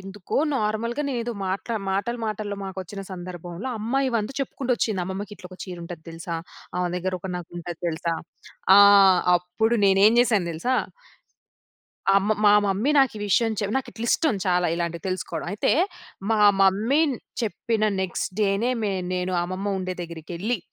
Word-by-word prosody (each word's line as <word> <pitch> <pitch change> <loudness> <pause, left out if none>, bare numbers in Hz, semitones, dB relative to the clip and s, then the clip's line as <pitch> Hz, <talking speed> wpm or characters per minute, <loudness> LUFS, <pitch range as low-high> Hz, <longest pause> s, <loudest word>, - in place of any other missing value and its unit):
ఎందుకో 195 0 -6 0.2
నార్మల్‌గానేదో 235 +3 -1
మాట్ల 195 +5 -2 0.2
మాటల 205 +5 -1
మాటల్లో 210 -1 -3
మాకొచ్చిన 190 +1 -6
సందర్భంలో 175 +4 -6
అమ్మాయివం‌తు 235 0 0
చెప్పుకుంటొచ్చింది, 240 -6 -1
అమ్మమ్మకిట్లొక 190 -1 -7
చీరుంటది 170 -3 -8
తెలుసా? 165 +1 -5 0.4
ఆమె 180 - 0
దగ్గర 185 +1 -2
ఒక 190 - -6
నగుంటది 175 -1 -7
తెలుసా? 165 +1 -2 0.6
ఆహ్, 200 -2 +8 0.2
అప్పుడు 180 +7 0
నేనేం 195 +3 +5
జేశానో 210 -8 +2
తెలుసా? 205 +11 -1 1.4
అమ్మ 200 +2 +2
మా 205 - +7
మమ్మీ 200 +9 +1
నాకీ 265 -5 +3
విషయం‌ 225 +3 +2
చెప్ 205 0 -2
నాకిట్లిష్టం 245 +2 0
చాలా 180 -2 +2
ఇలాంటియి 170 +1 -3
తెలుసుకోడం. 185 -3 -3
అయితే, 205 - +1 0.6
మా 220 -1 +3 0.2
మమ్మీ 210 +9 +3
న్ 260 - -3 0.3
చెప్పిన 220 +1 -1 0.2
నెక్స్ట్ 190 -1 -2
డే‌నే 205 +4 +2
మే 205 -2 0 0.2
నేను 180 0 -1
అమ్మమ్మ 190 +3 -2
ఉండే 185 0 -3
దెగ్గిరకెళ్ళి, 170 +6 -4
195 Hz, 125 wpm, -24 LUFS, 180-225 Hz, 1.4 s, ఆహ్